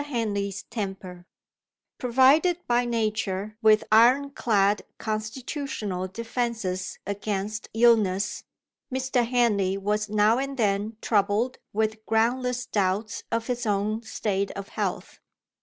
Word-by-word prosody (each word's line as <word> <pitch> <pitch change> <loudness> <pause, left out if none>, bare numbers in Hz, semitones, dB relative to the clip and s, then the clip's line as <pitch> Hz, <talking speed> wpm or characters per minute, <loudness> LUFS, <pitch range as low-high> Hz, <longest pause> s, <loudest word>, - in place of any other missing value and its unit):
HENLEY'S 210 -7 -2
TEMPER 190 -4 -6 0.7
PROVIDED 270 +8 +4
by 245 0 +2
nature 215 -3 -2
with 215 -1 +5
ironclad 230 -4 +4 0.2
constitutional 215 - -4
defences 225 -3 -3
against 205 +1 -3
illness, 215 -4 +3 0.5
Mr. 260 -1 +1
Henley 210 -6 +2
was 210 +2 -1
now 215 +3 +3
and 275 0 -3
then 210 0 0
troubled 210 +4 +1
with 220 +1 -1
groundless 245 +2 +1
doubts 205 +1 -1
of 230 0 -1
his 245 -1 -2
own 210 +2 0
state 200 -3 -2
of 200 0 -7
health. - - -4
215 Hz, 105 wpm, -26 LUFS, 200-240 Hz, 0.7 s, with